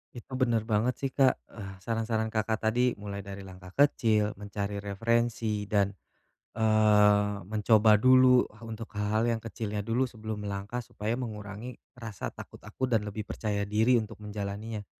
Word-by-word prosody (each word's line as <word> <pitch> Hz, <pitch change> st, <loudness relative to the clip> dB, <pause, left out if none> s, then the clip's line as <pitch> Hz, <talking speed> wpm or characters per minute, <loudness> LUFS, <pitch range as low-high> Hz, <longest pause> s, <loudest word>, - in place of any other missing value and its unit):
Itu 125 Hz, +2 st, -8 dB
bener 120 Hz, -4 st, +1 dB
banget 110 Hz, +3 st, +2 dB
sih, 135 Hz, -, -1 dB
Kak, 135 Hz, -2 st, +4 dB, 0.2 s
eh, 100 Hz, -3 st, -7 dB
saran-saran 110 Hz, +1 st, -1 dB
Kakak 110 Hz, 0 st, -1 dB
tadi, 125 Hz, +3 st, +3 dB
mulai 100 Hz, -1 st, -6 dB
dari 100 Hz, 0 st, -8 dB
langkah 90 Hz, 0 st, -12 dB
kecil, 110 Hz, -6 st, +2 dB
mencari 100 Hz, 0 st, -4 dB
referensi, 115 Hz, +1 st, 0 dB
dan, 100 Hz, -2 st, +3 dB, 0.7 s
eee, 105 Hz, -2 st, +4 dB
mencoba 110 Hz, 0 st, +5 dB
dulu 130 Hz, +2 st, +6 dB
ha 105 Hz, -, -19 dB
untuk 115 Hz, 0 st, -8 dB
hal-hal 105 Hz, +2 st, 0 dB
yang 115 Hz, -1 st, 0 dB
kecilnya 105 Hz, -2 st, -4 dB
dulu 115 Hz, +5 st, +1 dB
sebelum 110 Hz, -3 st, -6 dB
melangkah, 100 Hz, +4 st, -4 dB
supaya 110 Hz, +3 st, -3 dB
mengurangi 110 Hz, 0 st, -6 dB, 0.2 s
rasa 115 Hz, -6 st, -5 dB
takut -, -, -12 dB
aku 130 Hz, -, -3 dB
dan 115 Hz, -4 st, +1 dB
lebih 105 Hz, +1 st, -5 dB
percaya 105 Hz, -2 st, -2 dB
diri 110 Hz, +4 st, +3 dB
untuk 110 Hz, -2 st, -5 dB
menjalaninya. 105 Hz, +1 st, -5 dB
110 Hz, 150 wpm, -29 LUFS, 105-115 Hz, 0.7 s, dulu